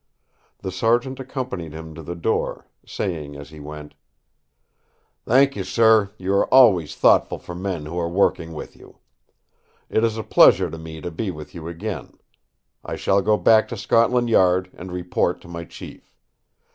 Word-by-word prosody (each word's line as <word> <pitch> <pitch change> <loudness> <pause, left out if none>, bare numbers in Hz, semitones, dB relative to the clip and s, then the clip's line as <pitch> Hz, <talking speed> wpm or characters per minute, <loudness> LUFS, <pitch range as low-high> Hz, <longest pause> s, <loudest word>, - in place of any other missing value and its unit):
The 95 - -3
Sergeant 120 +6 0
accompanied 125 - -5
him 80 0 -9
to 80 - -9
the 85 +3 -6
door, 85 - -2 0.2
saying 75 -5 -5
as 70 +1 -10
he 75 - -12
went: 75 0 -9 1.3
"Thank 135 +3 +4
you, - - -3
sir; 110 -3 +4
you 95 +1 -2
are 100 - +1
always 105 - +5
thoughtful - - +3
for 85 - -10
men 90 -3 -4
who 85 +3 -4
are 85 -1 -1
working 85 -3 0
with 75 - -8
you. - - -17 0.9
It 110 - +2
is 115 -1 +1
a 110 - -3
pleasure - - +5
to 80 - -7
me 80 -1 -9
to 90 - -5
be 95 +5 -3
with 75 -4 -8
you 85 -2 -8
again. 85 -1 -6 0.7
I - - -5
shall 100 +1 +1
go 105 +2 +2
back 110 0 +4
to 120 - -6
Scotland 120 +4 +2
Yard 95 -2 +3
and 90 +1 -9
report 90 0 -1
to - - -15
my 85 0 -7
chief. - - -12
90 Hz, 170 wpm, -22 LUFS, 80-110 Hz, 1.3 s, always